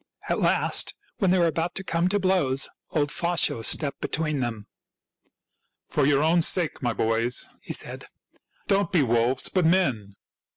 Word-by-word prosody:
At - - 0
last, - - +2 0.2
when 195 - +2
they 185 - +3
were 175 - +3
about 165 +1 -1
to 195 - -4
come 170 -1 0
to 205 - +1
blows, 180 -9 +1 0.2
old 145 -1 0
Faustulus 170 -9 +1
stepped 145 -3 0
between 155 -2 -2
them. 115 -4 -4 0.7
" - - -52
For 145 -3 +2
your 145 0 +3
own 165 +2 +3
sakes, 170 -1 +1
my 120 -2 0
boys," 115 +2 -1
he - - -6
said, - - -2 0.3
" - - -41
don't 200 0 +1
be 170 -7 +3
wolves, 120 +1 +1
but 185 - +1
men. 135 - +1
155 Hz, 170 wpm, -25 LUFS, 125-175 Hz, 0.7 s, they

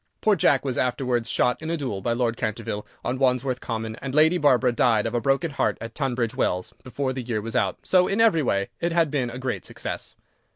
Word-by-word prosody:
Poor 215 -1 +3
Jack 145 -5 +3
was 130 -2 -1
afterwards 125 -2 0
shot 125 +2 +1
in 160 - -4
a 170 - 0
duel 125 -10 -3
by 120 - -1
Lord 120 -1 0
Canterville 110 -2 -4 0.2
on 125 +2 -1
Wandsworth 130 -1 +1
Common, 110 -1 -4
and 135 0 -5
Lady 160 +3 +5
Barbara 130 -4 +4
died 115 -2 +2
of - - -2
a 120 - 0
broken 140 +5 +1
heart 140 - 0
at 115 0 -7
Tunbridge 125 -5 -1
Wells 90 0 -1
before 130 0 -3
the 130 - -4
year 115 -3 -2
was 110 +2 -6
out, - - +1
so, 180 -1 +4
in 200 - -1
every 220 -8 +5
way, 100 -7 0
it 170 0 0
had 165 -3 +2
been 130 -5 0
a 120 - -7
great 130 0 -3
success. - - -6
125 Hz, 225 wpm, -24 LUFS, 115-145 Hz, 0.2 s, Lady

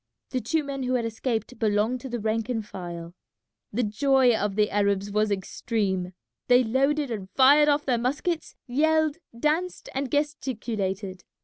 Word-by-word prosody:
The 255 - -1
two 310 +8 0
men 275 -1 -4
who 255 0 0
had 235 -2 0
escaped 225 +1 -3
belonged 220 +3 +1
to 265 - -7
the 240 -1 -3
rank 220 +2 -1
and 225 -4 -2
file. 175 -4 -7 0.6
The 245 +4 0
joy 250 +3 +3
of 205 -2 -1
the 210 0 +2
Arabs 200 0 +1
was 215 +1 +2
extreme. 190 -2 -2 0.3
They 250 0 +6
loaded 275 +4 +1
and 200 -4 -5
fired 290 +3 +6
off 290 0 +2
their 245 -3 +1
muskets, 295 +7 -2
yelled, 315 +4 +2 0.2
danced, 325 +6 -1
and 270 0 -2
gesticulated. 215 -10 -2
240 Hz, 155 wpm, -26 LUFS, 205-275 Hz, 0.6 s, They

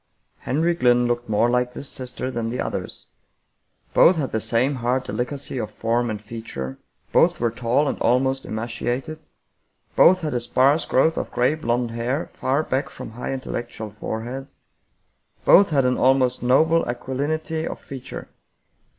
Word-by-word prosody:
Henry 165 +5 +1
Glynn 125 -5 +3
looked 120 0 -1
more 110 +2 +3
like 125 0 +1
this 140 - -5
sister 130 0 -4
than 115 -2 -2
the 125 - -4
others. - - -4 0.9
Both 185 - +6
had 145 -6 -2
the 110 - 0
same 125 +6 +1
hard 125 +2 0
delicacy 135 +1 -3
of 110 -2 -3
form 115 +3 -1
and 105 -1 -3
feature, 105 - -7 0.3
both - - +4
were 120 -1 +1
tall 125 +5 +1
and - - -2
almost 130 +2 +2
emaciated, 120 +7 -3 0.8
both 185 0 +6
had 155 -4 -2
a 120 - +1
sparse 135 +6 +2
growth 160 +5 +2
of - - -2
gray 125 +4 +2
blond 120 -5 -1
hair 120 +6 -2
far 135 +4 0
back 135 0 -1
from - - -9
high 120 +4 -5
intellectual 120 -4 -5
foreheads, 120 +6 -6 0.9
both 200 +1 +7
had 140 -4 +2
an 125 0 +1
almost 130 -1 +3
noble 160 +7 +4
aquilinity 150 +6 -2
of - - -6
feature. 135 -2 -8
125 Hz, 155 wpm, -23 LUFS, 120-140 Hz, 0.9 s, both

